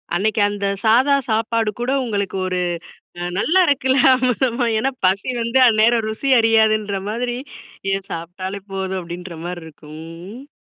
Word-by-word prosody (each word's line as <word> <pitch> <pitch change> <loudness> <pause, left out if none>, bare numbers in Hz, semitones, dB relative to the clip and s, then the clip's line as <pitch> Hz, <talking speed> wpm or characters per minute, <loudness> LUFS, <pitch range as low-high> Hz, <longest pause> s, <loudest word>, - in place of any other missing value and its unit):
அன்னக்கி 210 +3 +1
அந்த 205 -1 -4 0.2
சாதா 255 +6 +4
சாப்பாடு 225 0 +1
கூட 245 +2 -1
உங்களுக்கு 200 -4 -2
ஒரு 185 -1 -1 0.6
அ - - -3
நல்லா 360 - +3
இருக்குல, 265 -3 +2 0.2
ஆமா 255 0 +2 0.2
ஆமா 240 +1 -1
ஏன்னா, 265 +4 0
பசி 195 +6 +2
வந்து 235 +3 +1
அந்நேரம் 225 +1 +3
ருசி 220 +6 -3
அறியாதுன்ற 215 -3 +2
மாதிரி, 240 +2 -2 0.6
ஏன் 195 0 -2
சாப்ட்டாலே 185 +4 -6
போதும், 190 0 -3
அப்பிடின்ற 175 0 -8
மாரி 175 -1 -5
இருக்கும். 155 0 -12
ம், 175 +7 -10
ம். 280 +3 -14
215 Hz, 150 wpm, -20 LUFS, 190-240 Hz, 0.6 s, சாதா